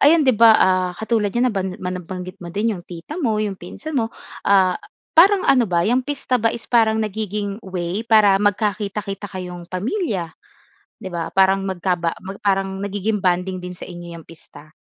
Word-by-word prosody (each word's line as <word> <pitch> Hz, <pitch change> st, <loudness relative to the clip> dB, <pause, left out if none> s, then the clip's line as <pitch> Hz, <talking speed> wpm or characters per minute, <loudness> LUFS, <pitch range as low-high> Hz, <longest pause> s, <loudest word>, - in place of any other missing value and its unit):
ayan 305 Hz, +1 st, +5 dB
'di 260 Hz, -, +5 dB
ba, 225 Hz, 0 st, +7 dB
ah, 185 Hz, -1 st, +3 dB
katulad 220 Hz, -1 st, 0 dB
niyan 250 Hz, +1 st, +3 dB
naban 190 Hz, -1 st, -1 dB
ma 180 Hz, 0 st, -4 dB
nabanggit 185 Hz, +1 st, -7 dB
mo 175 Hz, -, -7 dB
din 210 Hz, +5 st, 0 dB
'yong 180 Hz, -4 st, -8 dB
tita 180 Hz, -, -7 dB
mo, 225 Hz, -6 st, +1 dB
'yong 205 Hz, -3 st, -2 dB
pinsan 310 Hz, -, -8 dB
mo, 225 Hz, -, -1 dB, 0.4 s
ah, 190 Hz, -2 st, +4 dB, 0.3 s
parang 380 Hz, +4 st, +6 dB
ano 245 Hz, -6 st, +4 dB
ba, 170 Hz, -1 st, +1 dB
'yang 245 Hz, +4 st, +2 dB
pista 255 Hz, -2 st, -2 dB
ba 230 Hz, -, +3 dB
is 230 Hz, 0 st, -5 dB
parang 225 Hz, -2 st, +3 dB
nagiging 210 Hz, -1 st, -3 dB
way 185 Hz, 0 st, -3 dB
para 215 Hz, -4 st, +4 dB
magkakita-kita 205 Hz, -1 st, -1 dB
kayong 180 Hz, -2 st, -7 dB
pamilya, 190 Hz, -, -2 dB, 0.7 s
'di 190 Hz, -, -5 dB
ba. 165 Hz, -1 st, -3 dB
Parang 195 Hz, 0 st, +3 dB
magkaba 175 Hz, -2 st, -1 dB, 0.2 s
parang 195 Hz, -1 st, 0 dB
nagiging 205 Hz, +1 st, -2 dB
bonding 185 Hz, 0 st, 0 dB
din 180 Hz, 0 st, -7 dB
sa -, -, -10 dB
inyo 175 Hz, -1 st, -9 dB
'yang 165 Hz, -, -13 dB
pista? 155 Hz, -2 st, -15 dB
195 Hz, 180 wpm, -21 LUFS, 180-220 Hz, 0.7 s, ba